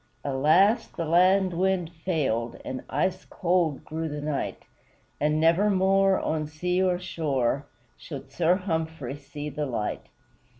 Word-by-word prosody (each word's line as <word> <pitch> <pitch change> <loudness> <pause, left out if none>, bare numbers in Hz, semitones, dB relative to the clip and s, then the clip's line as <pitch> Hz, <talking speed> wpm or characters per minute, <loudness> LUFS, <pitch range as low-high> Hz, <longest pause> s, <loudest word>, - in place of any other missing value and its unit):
Alas! 155 - +3
the 165 - -5
land 185 +3 +4
wind 180 -1 0
failed, 145 -9 -1
And 130 - -5
ice 185 0 0
cold 170 -5 0
grew 160 0 -3
the 150 0 -4
night; 145 -1 -3 0.6
And 150 +1 +1
nevermore, 190 +3 +3
on 155 -1 -1
sea 180 +4 -1
or 185 -1 +2
shore, 140 -6 -1 0.3
Should 140 -4 -9
Sir 175 +1 +3
Humphrey 160 -7 -3
see 145 +1 -8
the 150 +1 -3
light. 115 -5 -3
160 Hz, 130 wpm, -26 LUFS, 145-185 Hz, 0.6 s, land